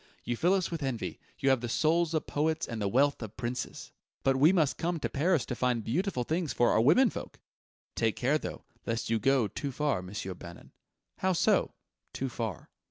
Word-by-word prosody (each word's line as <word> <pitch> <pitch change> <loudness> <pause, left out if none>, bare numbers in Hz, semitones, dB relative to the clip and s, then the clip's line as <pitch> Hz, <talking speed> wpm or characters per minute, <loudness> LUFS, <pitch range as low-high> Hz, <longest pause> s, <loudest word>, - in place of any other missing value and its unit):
"You 120 - -2
fill 175 +10 +3
us 185 -3 -1
with 165 -2 -3
envy: 130 -5 -3 0.2
you 135 - +3
have 130 -3 +2
the 120 - -3
souls 165 +5 +2
of 155 - 0
poets 155 +2 0
and 115 -2 -5
the 100 - +1
wealth 140 +7 +2
of 110 -2 -7
princes!" 125 +1 -4 0.3
"But 135 0 +3
we 145 +6 +6
must 160 -7 +2
come 170 0 -1
to - - -2
Paris 155 0 +1
to - - -4
find 125 -2 0
beautiful 145 - -1
things 160 +3 -1
for 120 - +3
our - - +4
women 190 - +5
folk!" - - -8 0.5
"Take 110 -1 +1
care, 140 +5 +1
though, - - -6 0.2
lest 115 -1 -2
you 115 - +2
go 130 0 +3
too 140 +8 -4
far, 140 -7 0
Monsieur 95 +1 -5
Bannon." 85 -1 -12 0.5
"How 190 0 +2
so 170 - +2 0.4
too 135 - -2
far?" 110 -8 -5
135 Hz, 205 wpm, -30 LUFS, 115-160 Hz, 0.5 s, we